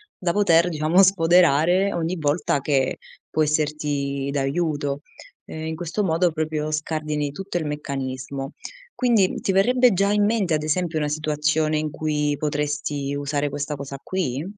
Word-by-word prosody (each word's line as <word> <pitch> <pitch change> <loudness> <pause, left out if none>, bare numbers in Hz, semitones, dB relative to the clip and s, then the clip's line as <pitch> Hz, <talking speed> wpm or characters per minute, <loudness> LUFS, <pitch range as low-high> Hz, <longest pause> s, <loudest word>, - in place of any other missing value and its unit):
da 175 -3 -1
poter, 175 -4 +4
diciamo, 160 +3 +3
sfoderare 180 0 +4
ogni 170 +1 -1
volta 145 -1 +1
che 135 -2 +1 0.3
può 155 - -1
esserti 145 -2 -1
d'aiuto. 145 0 -1 0.4
E, 160 0 -7
in 160 0 -3
questo 175 +5 -2
modo, 170 -1 +2
proprio 155 -1 -2
scardini 155 -1 -2
tutto 195 +4 -4
il 165 - -2
meccanismo. 135 -2 -4 0.4
Quindi 230 -7 +2
ti - - 0
verrebbe 250 +6 +4
già 200 +2 +2
in 205 0 +3
mente, 205 -6 +1
ad 155 - +1
esempio, 160 +1 0
una 150 - 0
situazione 155 +1 0
in 155 0 -2
cui 150 -1 -1
potresti 145 -1 -2
usare 145 0 -1
questa 145 +1 -3
cosa 140 0 -7
qui? 155 -7 -2
155 Hz, 150 wpm, -23 LUFS, 145-175 Hz, 0.4 s, poter